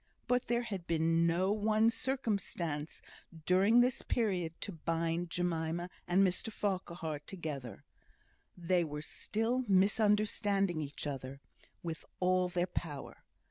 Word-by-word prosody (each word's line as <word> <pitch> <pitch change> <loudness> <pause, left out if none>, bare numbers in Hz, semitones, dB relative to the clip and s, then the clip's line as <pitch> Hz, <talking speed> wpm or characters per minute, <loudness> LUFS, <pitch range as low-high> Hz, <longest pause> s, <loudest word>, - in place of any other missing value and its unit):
But 250 0 +1
there 240 0 +1
had 195 -7 -5
been 165 0 +3
no 180 +4 +2
one 215 +2 +3
circumstance 200 - -2 0.4
during 200 +6 +5
this 250 0 +2
period 180 -8 -1
to - - -3
bind 165 +1 -1
Jemima 175 0 -1 0.2
and 185 +3 +5
Mr 185 +4 0
Farquhar 175 -7 -2
together. 150 - -6 0.7
They 175 0 +2
were 150 -1 -5
still 225 +9 -1
misunderstanding 200 -2 +3
each 145 0 -5
other 135 -1 -5 0.4
with 165 -1 -4 0.2
all 185 0 +2
their 175 0 +1
power. 160 -5 -6
180 Hz, 120 wpm, -33 LUFS, 165-210 Hz, 0.7 s, during